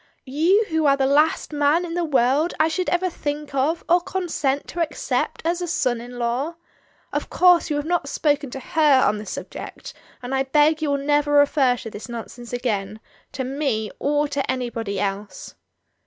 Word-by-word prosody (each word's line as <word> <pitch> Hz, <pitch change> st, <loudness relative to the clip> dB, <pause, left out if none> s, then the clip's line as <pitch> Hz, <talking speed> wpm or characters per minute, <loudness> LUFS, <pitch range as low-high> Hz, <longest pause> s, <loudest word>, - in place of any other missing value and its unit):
— -, -, -43 dB
you 335 Hz, +11 st, +2 dB
who 320 Hz, -2 st, +1 dB
are 275 Hz, 0 st, +4 dB
the 270 Hz, -, +2 dB
last 300 Hz, +3 st, +2 dB
man 295 Hz, +4 st, +2 dB
in 335 Hz, -, -6 dB
the 350 Hz, 0 st, 0 dB
world 280 Hz, +2 st, +2 dB
I 315 Hz, -, +4 dB
should 365 Hz, +3 st, -1 dB
ever 355 Hz, +1 st, +1 dB
think 295 Hz, -4 st, -4 dB
of, 290 Hz, +5 st, 0 dB
or 350 Hz, +1 st, +4 dB
consent 340 Hz, -7 st, -2 dB
to 345 Hz, -, -3 dB
accept 320 Hz, -2 st, -2 dB
as 345 Hz, +2 st, 0 dB
a 350 Hz, -, -2 dB
son 250 Hz, -8 st, 0 dB
in 245 Hz, +1 st, -9 dB
law. 245 Hz, +7 st, -1 dB, 0.6 s
Of -, -, -2 dB
course 355 Hz, -2 st, +4 dB
you 300 Hz, -, 0 dB
have 290 Hz, 0 st, -2 dB
not 335 Hz, -4 st, -1 dB
spoken 290 Hz, -2 st, 0 dB
to 265 Hz, -, -6 dB
her 290 Hz, -2 st, +3 dB
on 210 Hz, +1 st, 0 dB
the 210 Hz, -, -9 dB
subject, -, -, -7 dB, 0.3 s
and 245 Hz, +2 st, -4 dB
I 265 Hz, -, +2 dB
beg 295 Hz, +3 st, +3 dB
that -, -, -17 dB
you 305 Hz, -, 0 dB
will 280 Hz, -, +1 dB
never 290 Hz, +1 st, +1 dB
refer 285 Hz, -3 st, +4 dB
to 225 Hz, -, -8 dB
this 210 Hz, +4 st, -9 dB
nonsense 235 Hz, +1 st, -8 dB
again, 215 Hz, -4 st, -2 dB, 0.3 s
to 260 Hz, -, -3 dB
me, 260 Hz, -5 st, -2 dB
or 295 Hz, +1 st, +1 dB
to 280 Hz, -2 st, -1 dB
anybody 230 Hz, -6 st, -3 dB
else." 200 Hz, -1 st, -4 dB
285 Hz, 200 wpm, -23 LUFS, 245-315 Hz, 0.6 s, are